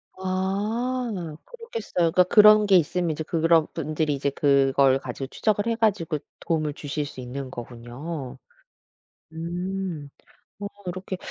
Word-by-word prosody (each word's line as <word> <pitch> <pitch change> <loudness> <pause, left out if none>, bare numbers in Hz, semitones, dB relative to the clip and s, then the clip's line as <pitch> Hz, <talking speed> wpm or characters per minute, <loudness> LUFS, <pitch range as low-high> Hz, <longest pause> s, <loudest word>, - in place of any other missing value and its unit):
아. 195 +1 -2
그렇겠어요. 225 - -2
그 180 - +5
그런 210 +3 +7
게 200 -2 +5
있으면 175 0 +2
이제 155 +1 -3
그런 165 0 +3
분들이 155 -1 -1
이제 140 +1 0
그걸 135 -1 +3
가지고 135 0 -6
추적을 210 +8 0
해 230 - +1
가지고 200 -8 +1 0.2
도움을 155 -3 -1
주실 145 0 -4
수 140 - -10
있는 130 +1 -6
거군요. 125 +5 -7 1.0
음 175 -1 -4 0.5
뭐 200 0 -4 0.2
이렇게 185 +1 -4
165 Hz, 265 characters per minute, -25 LUFS, 145-195 Hz, 1.0 s, 그런